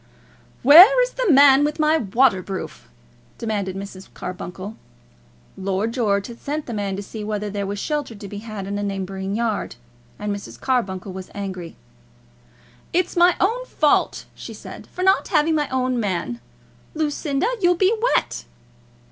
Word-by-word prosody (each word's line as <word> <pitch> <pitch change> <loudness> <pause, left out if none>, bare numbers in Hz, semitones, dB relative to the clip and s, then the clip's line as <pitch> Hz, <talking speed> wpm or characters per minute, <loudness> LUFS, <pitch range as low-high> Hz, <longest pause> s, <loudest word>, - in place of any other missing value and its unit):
"Where 360 - +9
is - - -2
the - - +1
man 280 0 +7
with 300 +2 -1
my 310 +1 +3
waterproof?" 190 - 0 0.5
demanded 205 -4 -3
Mrs. 195 -1 -9
Carbuncle. 185 +3 -7 0.8
Lord 195 +4 -2
George 200 -5 +1
had 235 -1 -10
sent 295 +1 -3
the 240 - -6
man 200 -2 -2
to 200 - -5
see 215 +1 -7
whether 210 -1 -3
there 200 -1 -3
was 200 +1 -4
shelter 290 +1 -3
to 200 0 -9
be 205 +1 -7
had 215 -3 -7
in 200 +1 -3
a - - -2
neighbouring 195 0 -3
yard. 225 - -2 0.4
And 205 -1 -3
Mrs. 200 - -10
Carbuncle 195 -8 -1
was 185 0 -8
angry. 185 -4 -6 1.2
"It's 360 +1 0
my 350 0 +5
own 465 +6 +1
fault," 300 -2 +1
she - - -9
said, - - -10
"for 365 - -5
not 380 +1 +3
having 320 -2 +2
my 300 -2 0
own 255 -1 0
man. 170 - -2 0.5
Lucinda, 295 0 -1 0.2
you'll 355 -1 +4
be 380 +5 +3 0.2
wet." - - -1
215 Hz, 155 wpm, -22 LUFS, 195-295 Hz, 1.2 s, Where